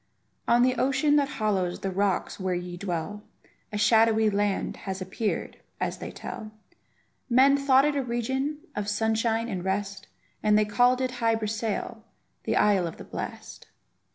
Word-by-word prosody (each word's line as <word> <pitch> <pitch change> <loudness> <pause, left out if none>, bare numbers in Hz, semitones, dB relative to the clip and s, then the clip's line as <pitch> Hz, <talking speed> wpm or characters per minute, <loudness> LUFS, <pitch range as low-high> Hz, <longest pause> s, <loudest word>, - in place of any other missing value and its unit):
On 240 +1 +5
the 255 0 +3
ocean 275 +3 +2
that 285 -1 +2
hollows 190 -5 0
the 195 - -2
rocks 195 +1 -1
where 185 -1 -1
ye 175 0 -5
dwell, 180 +2 -4 0.5
A 210 - -3
shadowy 220 0 +4
land 205 -1 -1
has 190 -1 -5
appeared, 195 +3 -3 0.2
as - - -2
they - - -6
tell; 215 - -7 0.8
Men 265 +3 +6
thought 275 -1 +4
it 295 -1 +1
a 280 - +1
region 265 +5 -2
of 210 -1 -3
sunshine 225 +2 0
and 190 -6 -4
rest, 195 +1 -3 0.3
And 210 0 +4
they 215 - +3
called 245 +4 +3
it 255 -1 0
Hy 230 -1 +3
Brasail, 220 +1 -3 0.4
the - - 0
isle 195 -4 +3
of 165 - -8
the - - -9
blest. - - -7
215 Hz, 160 wpm, -27 LUFS, 200-245 Hz, 0.8 s, Men